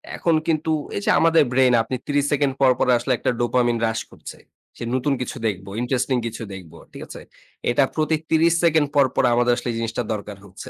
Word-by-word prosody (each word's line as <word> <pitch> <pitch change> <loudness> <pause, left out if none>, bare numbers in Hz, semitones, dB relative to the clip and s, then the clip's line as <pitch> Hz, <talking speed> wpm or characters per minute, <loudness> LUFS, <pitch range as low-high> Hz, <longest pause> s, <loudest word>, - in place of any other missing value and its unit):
এখন 165 -2 +1
কিন্তু 160 0 0 0.3
এই - - -3
যে - - +1
আমাদের 165 -2 +4
ব্রেইন 130 -1 +4
আপনি 130 - -4
৩০ 145 -1 +1
সেকেন্ড 140 -2 +1
পর, 130 -1 +6
পর, - - +1
আসলে 125 +2 -1
একটা 125 - -1
ডোপামিন 120 -1 +1
রাশ 110 0 -2
করছে। - - -11 0.4
সে - - -7
নতুন 135 +2 0
কিছু 125 - -5
দেখব, 95 -3 -4 0.2
ইন্টারেস্টিং 130 +1 0
কিছু 115 0 -7
দেখব। 90 -4 -11 0.2
ঠিক - - -11
আছে? - - -10 0.5
এটা 120 +4 +3
প্রতি 155 0 +1
৩০ 165 +1 +3
সেকেন্ড 160 -3 +3
পর, 140 -1 +5
পর, - - +2
আমাদের 120 0 +3
আসলে 120 - -4
এই 115 - -4
জিনিসটা 115 +1 -3
দরকার 105 -1 -7
হচ্ছে। 100 +6 -11
130 Hz, 210 wpm, -22 LUFS, 115-145 Hz, 0.5 s, পর